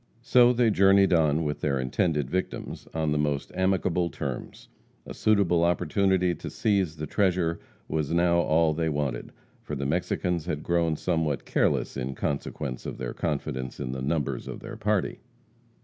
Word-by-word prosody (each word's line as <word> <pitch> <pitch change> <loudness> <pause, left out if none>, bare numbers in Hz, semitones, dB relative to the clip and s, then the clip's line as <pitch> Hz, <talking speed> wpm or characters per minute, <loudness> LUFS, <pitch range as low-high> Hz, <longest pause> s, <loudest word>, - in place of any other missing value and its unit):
So 125 0 +6
they 120 -2 +3
journeyed 95 -1 +5
on 80 -1 +3
with 75 -1 -3
their 70 -3 0
intended 75 +2 0
victims 95 +6 -4
on 80 -2 -1
the 75 - +1
most 75 -2 -1
amicable 95 -2 +1
terms. - - -6 0.4
A - - -7
suitable 100 -6 +2
opportunity 90 +1 +2
to - - -7
seize 95 -7 0
the 75 -1 -5
treasure 90 -1 +1 0.3
was 75 -1 -2
now 85 0 +3
all 80 -1 +3
that 80 - -4
they 80 - +1
wanted, 70 -5 -2 0.3
for 75 - -5
the 70 0 -3
Mexicans 85 +2 -1
had 75 0 -3
grown 85 -2 +1
somewhat 80 -3 -1
careless - - 0
in 65 +1 -3
consequence 70 -2 -3
of - - -5
their 60 -1 -4
confidence 65 -5 -3
in 60 - -3
the 65 0 -4
numbers 75 +1 -2
of - - -6
their - - -8
party. 105 -3 -1
80 Hz, 165 wpm, -27 LUFS, 75-95 Hz, 0.4 s, So